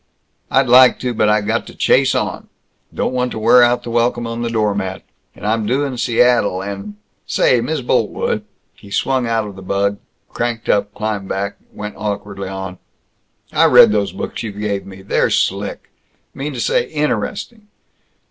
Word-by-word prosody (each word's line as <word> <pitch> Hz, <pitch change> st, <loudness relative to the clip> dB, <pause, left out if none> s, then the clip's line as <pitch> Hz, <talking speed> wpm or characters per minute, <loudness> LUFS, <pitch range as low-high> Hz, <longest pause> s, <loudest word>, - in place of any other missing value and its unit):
"I'd 135 Hz, +2 st, +3 dB
like 125 Hz, +1 st, +7 dB
to, 125 Hz, -1 st, -1 dB
but 110 Hz, -1 st, +2 dB
I 105 Hz, 0 st, +3 dB
got 100 Hz, -, -1 dB
to -, -, -11 dB
chase -, -, +3 dB
on. -, -, -3 dB, 0.4 s
Don't -, -, -2 dB
want 125 Hz, 0 st, 0 dB
to -, -, -5 dB
wear 115 Hz, +3 st, +5 dB
out 120 Hz, 0 st, +3 dB
the 120 Hz, -, -6 dB
welcome 120 Hz, 0 st, +1 dB
on 115 Hz, 0 st, -4 dB
the 120 Hz, -, -1 dB
doormat, 100 Hz, -4 st, -1 dB, 0.3 s
and -, -, -10 dB
I'm 110 Hz, 0 st, 0 dB
due 130 Hz, +5 st, +1 dB
in 135 Hz, -2 st, -4 dB
Seattle, 120 Hz, -5 st, +2 dB
and 100 Hz, +1 st, -6 dB, 0.3 s
Say, 125 Hz, -2 st, +3 dB
Miss 150 Hz, +4 st, -2 dB
Boltwood." 125 Hz, -, 0 dB, 0.3 s
He 100 Hz, -, -16 dB
swung 130 Hz, +4 st, 0 dB
out 115 Hz, -1 st, 0 dB
of 100 Hz, -2 st, -8 dB
the 95 Hz, -, -10 dB
bug, 100 Hz, +2 st, -1 dB, 0.3 s
cranked 120 Hz, -1 st, -3 dB
up, 100 Hz, 0 st, +2 dB
climbed 105 Hz, -3 st, -3 dB
back, 100 Hz, +1 st, -3 dB
went 105 Hz, 0 st, -7 dB
awkwardly 100 Hz, -2 st, -4 dB
on, 95 Hz, -1 st, -6 dB, 0.7 s
"I -, -, +4 dB
read -, -, +8 dB
those 100 Hz, -2 st, 0 dB
books -, -, -5 dB
you 110 Hz, -, -4 dB
gave 100 Hz, -1 st, -3 dB
me. 95 Hz, 0 st, -11 dB
They're 100 Hz, -, +1 dB
slick -, -, -1 dB, 0.4 s
mean 145 Hz, +2 st, -5 dB
to 125 Hz, -, -5 dB
say, -, -, +1 dB
interesting. 205 Hz, +8 st, -3 dB
110 Hz, 175 wpm, -18 LUFS, 100-125 Hz, 0.7 s, read